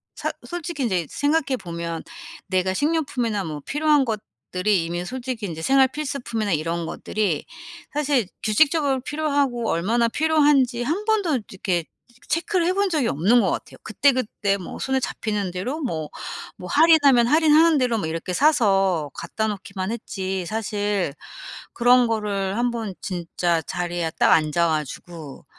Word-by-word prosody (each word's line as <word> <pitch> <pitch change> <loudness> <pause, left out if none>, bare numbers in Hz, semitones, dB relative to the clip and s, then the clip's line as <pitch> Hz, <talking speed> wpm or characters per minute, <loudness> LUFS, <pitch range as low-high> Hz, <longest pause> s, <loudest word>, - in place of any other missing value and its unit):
사 - - -3
솔직히 345 -4 -4
인제 185 - 0
생각해 285 -2 +1
보면 170 -4 -5 0.4
내가 185 0 +1
식료품이나 250 - 0
뭐 150 -2 -5
필요한 295 -1 +3
것들이 205 -3 -2
이미 175 +2 -3
솔직히 250 -1 -4
인제 160 -4 -5
생활 270 +5 +4
필수품이나 250 -7 -3
이런 165 +1 -1
것들이 190 -3 -2 0.5
사실 285 -7 +1 0.2
규칙적으로 280 +4 +3
필요하고 280 -4 -1
얼마나 230 +8 +1
필요한지 290 -4 +3
1 350 - -2
번도 400 - +1
이렇게 180 -3 -2 0.4
체크를 350 +1 0
해본 395 +2 +1
적이 305 -8 +1
없는 195 - +3
것 - - +1
같아요. - - -5
그때그때 220 -7 +1
뭐 185 - -8
손에 265 0 0
잡히는 210 -6 -3
대로 225 - -3
뭐 160 - -3 0.5
뭐 180 - -8
할인하면 290 -6 +6
할인하는 315 +2 +5
대로 250 -4 +1
뭐 185 - -2
이렇게 165 +3 -4
사서 195 - +2
갖다 220 0 -3
놓기만 195 -1 -4
했지 190 -5 -4
사실 205 -4 -1 0.6
그런 245 +1 +5
거를 205 -3 -1
한번 235 -4 -1
진짜 175 -3 -1
자리에 175 +1 -3
딱 - - +6
앉아 160 +2 +2
가지고 155 0 -5
220 Hz, 320 characters per minute, -23 LUFS, 180-280 Hz, 0.6 s, 할인하면